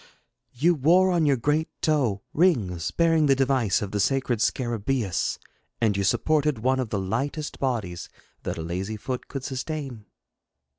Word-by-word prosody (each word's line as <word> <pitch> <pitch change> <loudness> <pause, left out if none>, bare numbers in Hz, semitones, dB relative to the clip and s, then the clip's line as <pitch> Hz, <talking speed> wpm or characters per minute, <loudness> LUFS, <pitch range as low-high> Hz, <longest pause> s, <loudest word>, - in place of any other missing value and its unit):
You 165 +8 +3
wore 175 +6 +4
on 170 -4 +2
your 140 -2 +3
great 150 +6 0
toe 130 -11 +1
rings 105 - +2
bearing 165 -2 +3
the 135 - +5
device 130 -7 +1
of 100 - -5
the 105 - -1
sacred 130 0 +1
Scarabseus, 120 -3 -1 0.4
and 110 -3 +2
you 100 - 0
supported 145 +7 +2
one 130 +4 +1
of 125 -4 -2
the 105 - -1
lightest 135 +10 -3
bodies 110 -10 -2 0.3
that - - -4
a 80 - -4
lazy 95 +6 -4
foot 125 +3 -5
could 135 -2 -6
sustain.' 135 -4 -5
130 Hz, 155 wpm, -25 LUFS, 105-150 Hz, 0.4 s, the